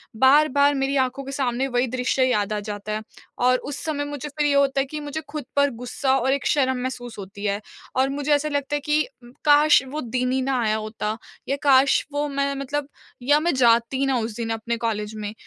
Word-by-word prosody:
बार-बार 285 +3 +5
मेरी 270 +1 0
आँखों 265 +2 -6
के 275 - -7
सामने 265 -1 -1
वही 245 0 +1
दृश्य 250 +1 0
याद 210 -3 0
आ 210 - -1
जाता 205 0 -6
है, 215 - -2 0.4
और 255 +1 +4
उस 285 +2 -7
समय 290 -2 -2
मुझे 290 0 -6
फिर 295 0 0
ये 285 - +2
होता 275 -1 +3
है - - -1
कि 300 +2 -6
मुझे 295 +2 -5
खुद 295 -3 -5
पर 285 0 +4
गुस्सा 265 +2 0
और 265 +2 +1
एक 280 - -2
शर्म 260 -3 +2
महसूस 245 -3 -5
होती 200 +1 -8
है। 200 +1 0 0.3
और 265 +1 +2
मुझे 290 +1 0
ऐसा 290 +1 +1
लगता 285 0 -1
है - - 0
कि 300 +1 +2 0.2
उम, 240 - -14
काश 295 0 +6
वो 300 +3 -4
दिन 250 +1 -1
ही 260 0 +1
ना 260 -1 0
आया 215 0 +1
होता 215 0 -4 0.3
या 275 - +1
काश 275 -1 +5
वो 295 0 0
मैं 280 0 -1
मतलब 275 +1 -3 0.4
या 290 +3 +4
मैं 340 +2 +1
जाती 240 +2 +3
ना 265 -2 +1
उस 220 -1 -4
दिन 230 -1 -3
अपने 235 +1 -2
कॉलेज 215 -2 -3
में। 210 -1 -5
265 Hz, 225 wpm, -23 LUFS, 235-285 Hz, 0.4 s, काश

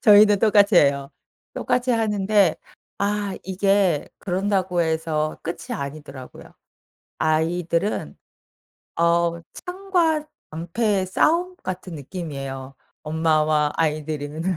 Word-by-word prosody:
저희는 210 -1 +7
똑같이 205 -1 +4
해요. 140 -2 +3 0.4
똑같이 250 0 0
하는데 210 -5 +2 0.4
아 200 -1 -1
이게 190 -3 +1
그런다고 185 -1 0
해서 160 -1 -1
끝이 170 0 -5
아니더라고요. 140 -2 -8 0.7
아이들은. 170 +4 0 0.8
어 170 0 +2
창과 360 -4 0 0.3
방패의 185 +5 -1
싸움? 340 - +2
같은 185 -1 -6
느낌이에요 135 -4 -6 0.3
엄마와 155 -1 +2
아이들이는. 155 -1 -2
175 Hz, 240 characters per minute, -23 LUFS, 155-205 Hz, 0.8 s, 저희는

